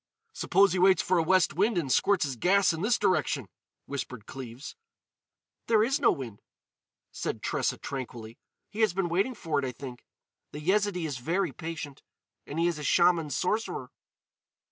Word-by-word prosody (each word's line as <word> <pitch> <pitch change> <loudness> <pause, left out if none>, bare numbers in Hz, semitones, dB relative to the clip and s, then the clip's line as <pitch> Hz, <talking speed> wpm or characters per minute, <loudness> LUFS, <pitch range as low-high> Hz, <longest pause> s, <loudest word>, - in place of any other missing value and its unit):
"Suppose 195 - +3
he 185 - 0
waits 190 +1 +5
for 185 -1 +2
a - - +2
west 180 -1 +3
wind 200 +5 +1
and 145 -6 -1
squirts 200 +7 +3
his 135 -2 -4
gas 185 - +3
in 160 - -4
this 235 +5 +2
direction?" 155 - +1 0.4
whispered 125 -5 -6
Cleves. 130 - -8 0.9
"There 220 -2 +4
is 270 +6 +1
no 265 - +5
wind," 120 -8 -6 0.7
said - - -4
Tressa - - 0
tranquilly. 120 -4 -7 0.3
"He 210 - -8
has 215 -5 +3
been 190 -2 0
waiting 195 +9 0
for 160 -8 -1
it, 140 - -2
I 130 - -2
think. 125 0 -9 0.5
The 150 - -6
Yezidee 190 +1 +1
is 140 -5 -4
very 170 +10 0
patient. 160 -4 -7 0.5
And 145 - -6
he 165 - +2
is 170 -3 0
a - - -6
Shaman 170 0 +3
sorcerer." 210 - -2
170 Hz, 170 wpm, -28 LUFS, 140-195 Hz, 0.9 s, waits